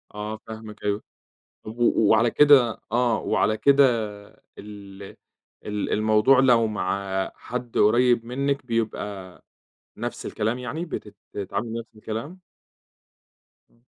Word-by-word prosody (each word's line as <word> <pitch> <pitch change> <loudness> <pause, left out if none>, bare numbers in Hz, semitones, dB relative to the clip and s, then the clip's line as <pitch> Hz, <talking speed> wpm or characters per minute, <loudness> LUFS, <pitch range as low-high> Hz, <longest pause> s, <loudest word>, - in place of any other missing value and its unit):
آه 105 +1 -5
فاهمِك 110 -1 -10
أيوه، 105 0 -1 0.6
طَب 110 +2 -9
و 115 -3 +3
وعلى 115 +2 +4
كده 135 -6 +5
آه 120 -1 +2
وعلى 110 +1 +1
كده 140 +2 +5 0.7
ال 100 -1 -11 0.6
ال 105 -1 -3
الموضوع 110 +5 +4
لو 120 -4 +4
مع 95 -2 -2
حد 125 -1 -6
قريّب 120 +2 +3
منِّك 140 +3 -2
بيبقى 105 -5 -4 0.6
نَفْس - - -5
الكلام 110 +4 -2
يعني 140 +8 -4
بتت 105 -10 -7 0.2
بتتعاملي 105 +4 -4
نَفْس 115 -1 -12
الكلام؟ 115 - -7 1.3
إمم. 115 - -31
110 Hz, 115 wpm, -24 LUFS, 105-125 Hz, 1.3 s, كده